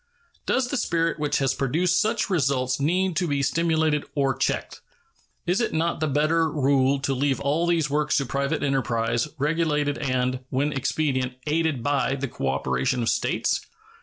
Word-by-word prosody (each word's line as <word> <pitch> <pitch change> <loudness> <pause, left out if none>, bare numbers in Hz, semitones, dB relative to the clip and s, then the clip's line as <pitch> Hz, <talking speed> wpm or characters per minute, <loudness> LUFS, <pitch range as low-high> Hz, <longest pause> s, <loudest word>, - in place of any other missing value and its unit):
Does 255 -1 +1
the 280 - -1
spirit 165 -6 0
which 150 -1 0
has 135 -1 +1
produced 170 +7 +1
such 220 +1 0
results 135 -7 0
need 180 +5 +1
to 180 - +1
be 140 -2 0
stimulated 160 0 +1
or 135 -3 +1
checked? - - -2 0.6
Is 180 +7 +1
it 235 - -1
not 165 +1 0
the 155 - 0
better 155 +3 +2
rule 140 -2 +2
to 140 -1 0
leave 135 +1 0
all 145 +5 0
these 165 -3 +2
works 150 +1 +1
to 140 - 0
private 140 +3 -1
enterprise, 120 -3 0
regulated 150 -1 0
and, 130 -2 0
when 145 +3 0
expedient, 135 -2 -1
aided 155 -4 0
by 140 -1 +1
the 135 0 -3
cooperation 70 - -1
of 115 - +1
States? - - 0
145 Hz, 165 wpm, -25 LUFS, 135-160 Hz, 0.6 s, better